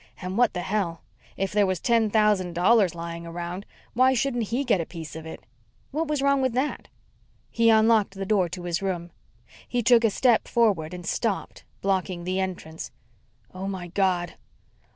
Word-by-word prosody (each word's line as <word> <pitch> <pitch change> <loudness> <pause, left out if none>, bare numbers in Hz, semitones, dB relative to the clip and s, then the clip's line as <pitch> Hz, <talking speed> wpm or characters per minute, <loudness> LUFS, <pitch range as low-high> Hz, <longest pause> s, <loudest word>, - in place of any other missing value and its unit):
And 185 0 -5
what 240 -3 +3
the 180 - -1
hell! 185 -5 -2 0.3
If 195 0 -1
there 205 -1 +3
was 185 -2 -1
ten 230 +1 +2
thousand 210 -4 +2
dollars 185 0 +3
lying 170 0 -6
around, 175 +3 -6 0.3
why 260 +2 +4
shouldn't 245 -2 0
he 240 +6 -1
get 220 -9 +2
a - - -4
piece 165 -3 -8
of 160 0 -8
it? 160 - -9 0.5
What 315 +3 -1
was 295 -2 -1
wrong 280 -1 +3
with 260 -2 +1
that? 260 +4 -2 0.6
He 230 -1 +3
unlocked 220 -2 +4
the 195 0 -4
door 190 -3 +2
to 180 +1 -7
his 175 0 -2
room. 175 -3 -3 0.6
He 245 -1 -1
took 240 0 +5
a 225 - +5
step 235 +2 +2
forward 185 -8 +1
and 175 -1 -9
stopped, 220 -5 -2 0.2
blocking 185 -2 -1
the 185 +2 -1
entrance. 175 -4 -5 0.6
"Oh, 185 +1 -5
my 185 -3 -5
God!" 180 -2 0
195 Hz, 180 wpm, -25 LUFS, 175-230 Hz, 0.6 s, took